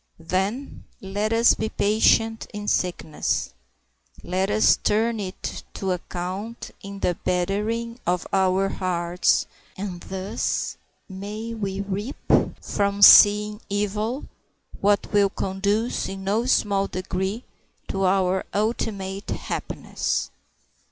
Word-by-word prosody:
Then, 190 +10 -3
let 205 +3 -2
us 230 +1 +5
be 220 - -2
patient 225 +2 +2
in 210 0 -5
sickness. 170 -5 -1 0.7
Let 185 +2 -1
us 215 +1 +4
turn 225 +2 +1
it 190 -2 -5
to 190 -1 -2
account 185 +5 -5
in 200 0 -8
the 180 - +2
bettering 210 +6 -1
of 180 0 +1
our 190 0 +3
hearts, 175 -2 +1 0.3
and 185 -3 -5
thus 190 +2 -2 0.3
may 210 +4 -6
we 200 -3 -3
reap 200 +6 -4 0.4
from 200 0 0
seeming 210 +2 +8
evil 210 +6 -2 0.5
what 205 +1 +1
will 200 -1 +4
conduce 200 +4 -1
in 195 0 -6
no 215 +5 0
small 200 -5 +2
degree 190 +4 -3 0.5
to 195 0 0
our 190 0 +2
ultimate 200 -2 -2
happiness. - - -3
200 Hz, 110 wpm, -24 LUFS, 190-215 Hz, 0.7 s, seeming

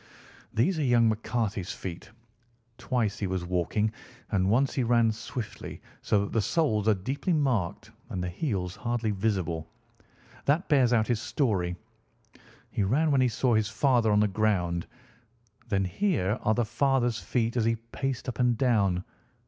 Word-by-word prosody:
"These 130 +10 +1
are - - +1
young 120 -3 +4
McCarthy's 110 -3 -2
feet. 90 0 -7 0.7
Twice 120 -5 -1
he 100 - -1
was 95 -1 -2
walking, 90 +4 0 0.4
and 95 -1 +2
once 130 +6 +2
he 130 - 0
ran 115 -1 +3
swiftly, 115 -1 -6 0.2
so 105 - +2
that 100 - -4
the 115 - +2
soles 110 -6 +1
are 110 - +5
deeply 135 - -2
marked 125 - 0 0.2
and 90 - -3
the - - -2
heels 90 - -2
hardly 120 -2 -1
visible. 95 -6 -1 0.8
That 150 +6 +2
bears 135 -5 +4
out 110 -3 +3
his 115 -1 0
story. 110 - 0 1.0
He 115 - -1
ran 140 +11 +2
when 135 -2 +4
he 130 - +4
saw 120 +2 +1
his 110 -2 +2
father 120 -1 +2
on 105 0 +4
the 105 - +4
ground. 95 -5 0 0.8
Then 95 -1 +1
here 110 - 0
are 110 - +2
the 120 - +1
father's 120 0 +1
feet 115 -1 -1
as 115 -3 +1
he 115 0 +2
paced 125 +3 -4
up 125 -2 -4
and 125 -2 +3
down. 100 -8 +2
110 Hz, 165 wpm, -28 LUFS, 100-125 Hz, 1.0 s, are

